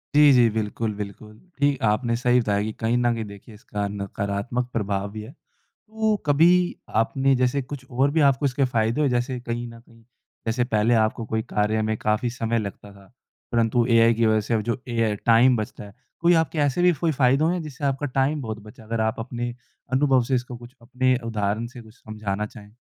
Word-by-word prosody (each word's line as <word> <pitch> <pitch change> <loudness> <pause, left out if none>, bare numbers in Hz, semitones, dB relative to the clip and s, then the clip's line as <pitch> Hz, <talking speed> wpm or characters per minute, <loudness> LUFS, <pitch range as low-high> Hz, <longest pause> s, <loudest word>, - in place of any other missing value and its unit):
जी 150 -1 +7
जी, 120 -2 +5
बिल्कुल, 110 0 -2
बिल्कुल। 105 +1 -8 0.2
ठीक 140 -1 +2
आपने 115 +2 +1
सही 125 +1 +3
बताया 105 -4 0
कि 110 - -3
कहीं 115 +2 +1
न 120 -1 +2
कि 115 - -3
देखिए 100 +1 -12
इसका 105 -3 -4
नकारात्मक 100 +4 -3
प्रभाव 100 -2 -2
भी 110 +1 -7
है। 110 - -10
तो 220 +6 -4
कभी, 175 +5 +4
आपने 135 +4 +2
जैसे 125 +2 +1
कुछ 130 0 -8
और 135 +3 +2
भी 160 +1 +2
आपको 135 +2 -1
इसके 135 0 +1
फ़ायदे 115 +2 0
हो, 145 - +3
जैसे 125 0 -1
कहीं 120 0 -4
न 115 0 -11
कहीं, 115 -1 -21 0.4
जैसे 120 +2 +1
पहले 115 -1 +1
आपको 110 +1 -2
कोई 110 0 -1
कार्य 105 +1 +1
में 110 0 0
काफ़ी 110 +4 0
समय 115 -1 -1
लगता 100 -1 -7
था, 100 -1 -18 0.4
परंतु 115 0 +2
एआई 115 0 +5
की 115 0 +1
वजह 110 -1 +3
से 110 - -3
अब 110 - +2
जो 120 +4 -3
एआई 115 -3 0
टाइम 120 +2 +5
बचता 110 -1 -5
है। 100 -1 -12 0.3
कोई 170 +1 +4
आपके 160 0 -6
ऐसे 145 +3 +1
भी 180 0 +5
कोई 165 - +2
फ़ायदे 135 0 +3
हुए 175 +3 +1
जिससे 150 -1 -9
आपका 140 +1 -1
टाइम 145 +3 +1
बहुत 110 -3 -5
बचा 110 +2 -14
अगर 110 +1 -2
आप 110 +1 -1
अपने 120 +1 -4 0.4
अनुभव 130 -2 +3
से 130 +2 0
इसको 125 0 -4
कुछ 120 +2 -14
अपने 130 +2 +1
उदाहरण 110 0 -1
से 125 0 -11
कुछ 110 -1 -16
समझाना 105 -3 -4
चाहें? 105 -1 -13
115 Hz, 205 wpm, -24 LUFS, 110-130 Hz, 0.4 s, जी